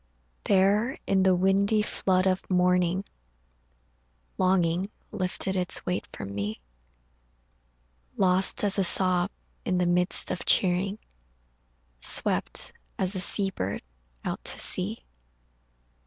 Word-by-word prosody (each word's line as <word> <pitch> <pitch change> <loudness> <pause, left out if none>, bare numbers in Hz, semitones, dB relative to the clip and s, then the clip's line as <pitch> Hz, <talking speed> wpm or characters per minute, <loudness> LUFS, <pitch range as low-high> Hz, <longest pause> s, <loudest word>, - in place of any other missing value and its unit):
There 205 +6 0
in 195 -1 0
the 190 -1 +2
windy 200 +3 0
flood 185 -2 -2
of 190 0 -3
morning 180 0 -1 1.3
Longing 185 0 -1 0.2
lifted 190 -1 -4
its 180 -1 0
weight 180 0 -5
from 100 0 -9
me, 100 +2 -6 1.6
Lost 185 +2 0
as 200 -1 -1
a - - +1
sob 185 0 +4 0.3
in 185 - -3
the 180 - -1
midst 180 +1 +2
of 180 - -6
cheering, 190 +2 0 1.0
Swept - - +1 0.2
as 190 +1 -2
a 190 - -1
sea 195 +1 +7
bird 100 - -6 0.4
out - - -6
to - - +1
sea. - - +5
185 Hz, 110 wpm, -24 LUFS, 180-195 Hz, 1.6 s, sea